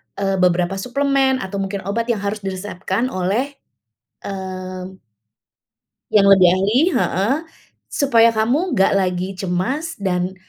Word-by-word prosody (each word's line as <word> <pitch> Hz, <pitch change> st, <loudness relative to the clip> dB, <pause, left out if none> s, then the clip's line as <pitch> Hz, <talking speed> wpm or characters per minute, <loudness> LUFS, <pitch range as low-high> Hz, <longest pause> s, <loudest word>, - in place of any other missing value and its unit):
eee, 195 Hz, -1 st, -1 dB
beberapa 180 Hz, +1 st, +1 dB
suplemen 265 Hz, +3 st, +1 dB
atau 195 Hz, +1 st, -5 dB
mungkin 195 Hz, 0 st, -3 dB
obat 225 Hz, +5 st, -2 dB
yang 235 Hz, -3 st, 0 dB
harus 205 Hz, +1 st, -2 dB
diresepkan 195 Hz, +4 st, -3 dB
oleh, 220 Hz, +10 st, -2 dB, 0.6 s
mmm 185 Hz, -1 st, -6 dB, 1.1 s
yang 200 Hz, -2 st, +5 dB
lebih 190 Hz, -2 st, +7 dB
ahli, 195 Hz, +6 st, +2 dB
heeh. 205 Hz, -, +1 dB, 0.5 s
Supaya 230 Hz, -5 st, +3 dB
kamu 265 Hz, +10 st, +1 dB
nggak 190 Hz, -, +3 dB
lagi 185 Hz, 0 st, -1 dB
cemas 245 Hz, -, -2 dB
dan, 185 Hz, -2 st, -2 dB
195 Hz, 120 wpm, -20 LUFS, 185-235 Hz, 1.1 s, lebih